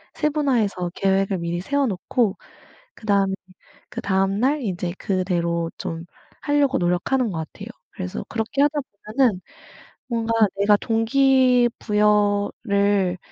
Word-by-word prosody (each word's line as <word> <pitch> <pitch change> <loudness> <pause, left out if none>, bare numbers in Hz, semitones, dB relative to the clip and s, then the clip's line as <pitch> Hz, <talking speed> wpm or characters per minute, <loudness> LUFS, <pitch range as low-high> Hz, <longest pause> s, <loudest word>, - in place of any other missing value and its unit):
세분화해서 245 - 0
계획을 195 -1 +1
미리 170 +1 -3
세워 280 +6 0
놓고 205 +2 0 0.6
그다음 200 -3 +1 0.6
그다음 195 +1 0
날 285 +4 +2
인제 180 -4 -3
그대로 170 -3 -1
좀 165 0 -5 0.4
하려고 290 -2 +2
노력하는 185 +8 0
것 170 - -4
같아요. - - -9 0.2
그래서 90 0 -5
그렇게 225 +4 -2
하다 295 0 +2 0.4
보면은 235 -9 +3 0.7
뭔가 230 -1 -1 0.2
내가 205 +1 +4
동기 250 +2 +3
부여를 205 -2 +1
205 Hz, 260 characters per minute, -22 LUFS, 185-250 Hz, 0.7 s, 내가